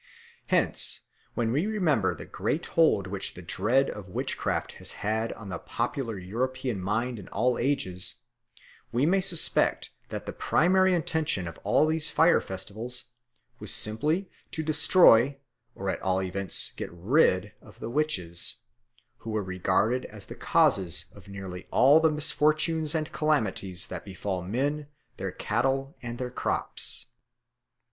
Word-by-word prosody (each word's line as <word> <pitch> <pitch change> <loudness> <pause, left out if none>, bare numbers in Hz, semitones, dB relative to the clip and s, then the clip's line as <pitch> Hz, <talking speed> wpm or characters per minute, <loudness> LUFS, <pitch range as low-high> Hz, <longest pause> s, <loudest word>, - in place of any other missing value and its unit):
Hence, - - +3 0.3
when 115 -1 0
we 150 - 0
remember 160 - +1
the - - -9
great 165 - -3
hold 160 - +2
which 95 0 -3
the 90 - -10
dread 115 +10 +1
of 100 -3 -9
witchcraft - - -2
has - - -1
had 110 +2 -1
on 105 -3 -11
the 95 - -5
popular 115 -2 -3
European 120 +3 -3
mind 115 +5 -2
in 95 - -11
all 125 -1 0
ages, 100 -9 0 0.8
we 125 +4 +1
may 190 +4 +3
suspect 180 -3 +2 0.2
that - - -6
the - - -6
primary 185 +2 +3
intention 160 - -1
of 85 - -9
all - - +2
these 160 0 +2
fire 165 +2 +4
festivals 115 +6 -5 0.5
was - - -3
simply 150 - +1 0.2
to 160 - -4
destroy 145 -4 +5 0.4
or 100 - -6
at 95 - -2
all 95 0 0
events 95 -1 +2
get - - -7
rid 95 - +2
of - - -17
the 115 - -6
witches, 95 - -2 0.6
who 115 - -9
were 110 -1 -1
regarded 95 +7 0
as 105 -2 -10
the - - -9
causes 90 -3 +2
of 100 0 -16
nearly 95 -2 -8
all 140 +4 +5
the 160 0 +3
misfortunes 155 +1 +3
and 155 -1 -2
calamities 105 - 0
that - - -7
befall 95 -1 -4
men, 140 +10 -2 0.3
their - - -4
cattle, 135 +1 -1
and 120 0 -6
their 125 0 -5
crops. - - +2
120 Hz, 145 wpm, -27 LUFS, 95-150 Hz, 0.8 s, destroy